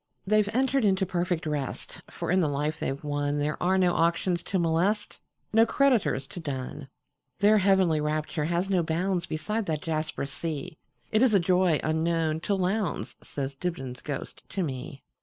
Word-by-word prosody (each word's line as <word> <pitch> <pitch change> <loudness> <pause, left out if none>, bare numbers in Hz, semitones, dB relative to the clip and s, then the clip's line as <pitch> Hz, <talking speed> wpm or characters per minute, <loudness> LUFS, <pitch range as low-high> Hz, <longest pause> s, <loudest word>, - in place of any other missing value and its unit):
"They 215 +2 +4
've 205 - -2
entered 265 +2 +2
into 190 -2 +3
perfect 175 -2 -1
rest; 150 -3 -4
For - - -4
in 185 - +4
the 165 - +3
life 150 +2 -1
they - - -1
've 135 +2 -5
wonThere 145 +1 -1
are 185 +2 +3
no 180 -2 +3
auctions 170 +1 +1
to 195 - -2
molest, 180 +5 0 0.3
No 225 +1 +7
creditors 235 - +2
to - - -7
dun. 135 -2 -5 0.5
Their 210 +2 +5
heavenly 190 -5 +3
rapture 150 +1 -1
has 175 +3 0
no 185 -3 +2
boundsBeside 175 +4 -1
that 155 -2 -2
jasper 155 -3 -2
sea; 145 +2 -5 0.3
It 215 - +3
is 250 -5 +5
a - - +6
joy 180 -2 +3
unknown 160 0 +1
to 200 +4 0
Lowndes,"Says 180 -7 -2
Dibdin's 135 -5 -4
ghost 145 -2 -6
to 190 +1 -2
me. 135 -2 -5
170 Hz, 165 wpm, -27 LUFS, 150-190 Hz, 0.5 s, No